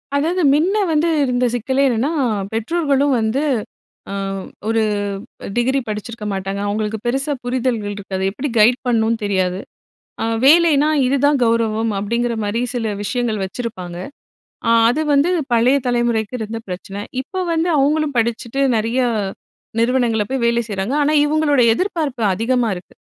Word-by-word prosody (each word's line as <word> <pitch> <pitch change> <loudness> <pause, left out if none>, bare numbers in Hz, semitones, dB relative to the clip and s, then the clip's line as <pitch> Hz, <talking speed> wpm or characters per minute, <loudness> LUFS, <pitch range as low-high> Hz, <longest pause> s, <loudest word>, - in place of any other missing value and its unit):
அதாவது, 330 +6 +1
மின்ன 345 +7 +2 0.2
வந்து 310 +1 +2 0.2
இருந்த 250 -1 +1
சிக்கலே 260 +3 0
என்னன்னா, 250 +6 0 0.4
பெற்றோர்களும் 280 +3 +1
வந்து 225 +6 0 0.7
அ - - -4 0.5
ஒரு 225 0 +2 0.8
டிகிரி 260 +3 +2
படிச்சிருக்க 215 +1 -5
மாட்டாங்க. 195 0 -3
அவங்களுக்கு 215 +1 -2
பெருசா 270 +4 0
புரிதல்கள் 245 -4 -1
இருக்காது. 190 -1 -4
எப்படி 260 +8 -4
கைட் 235 +4 +5
பண்ணும்னு 230 -1 +2
தெரியாது. 190 -2 0 0.6
அ - - 0 0.2
வேலைனா 305 0 +5 0.2
"இதுதான் 280 +2 +2
கௌரவம்." 225 -1 +1
அப்படிங்குற 235 +3 -1
மாரி 205 +3 -1
சில 225 -3 -2
விஷயங்கள் 220 -1 -1
வச்சிருப்பாங்க. 190 -4 -5 0.7
அ 230 - +4 0.2
அது 295 +6 0
வந்து 285 +5 +3 0.2
பழைய 240 +4 +4
தலைமுறைக்கு 240 -2 0
இருந்த 225 +1 -4
பிரச்சன. 195 +2 -6 0.2
இப்ப 370 +7 -4
வந்து 330 +2 +1
அவங்களும் 290 +1 +1
படிச்சுட்டு 235 +3 -1
நெறைய 225 +4 0 0.8
நிறுவனங்கள்ல 235 -3 +1
போய் 265 -2 -1
வேலை 235 0 +2
செய்யுறாங்க. 200 +5 -2
ஆனா, 300 +2 +2
இவங்களோட 295 -3 +2
எதிர்பார்ப்பு 305 - -2
அதிகமா 235 +3 +1
இருக்கு. 180 - -11
240 Hz, 135 wpm, -19 LUFS, 220-275 Hz, 0.8 s, கைட்